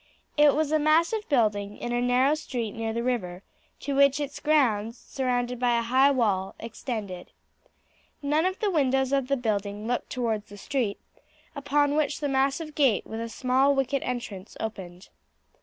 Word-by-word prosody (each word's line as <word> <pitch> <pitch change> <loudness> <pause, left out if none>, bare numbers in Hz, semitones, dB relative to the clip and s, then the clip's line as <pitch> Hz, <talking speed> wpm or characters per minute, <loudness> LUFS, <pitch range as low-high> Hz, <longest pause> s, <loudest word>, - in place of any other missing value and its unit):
It 295 -1 +5
was 305 -1 0
a 310 - +3
massive 335 +8 +2
building, 210 -6 +1
in 240 - -4
a 240 - +1
narrow 250 +3 +3
street 245 -8 -3
near 225 0 -3
the 235 +1 -2
river, 195 -7 -2 0.4
to 285 - -3
which 280 +1 +4
its 285 -1 -4
grounds, 235 -7 +2
surrounded 250 -2 -2
by 245 -1 +2
a 235 - 0
high 260 +4 +4
wall, 205 -8 0
extended. 215 -6 -6 0.9
None 305 +5 +2
of 375 +1 -3
the 420 -2 0
windows 270 -4 +1
of 275 -2 +1
the 275 0 +1
building 210 -3 -2
looked 245 +1 -2
towards 225 -4 -2
the 205 - -11
street, 230 -1 -2 0.6
upon 285 0 +1
which 300 -1 0
the 290 - -1
massive 275 +3 0
gate, 270 -9 +2
with 220 - -6
a 230 - -4
small 260 +4 +2
wicket 270 0 0
entrance, 225 -6 -5
opened. 190 -4 -7
250 Hz, 170 wpm, -26 LUFS, 220-280 Hz, 0.9 s, It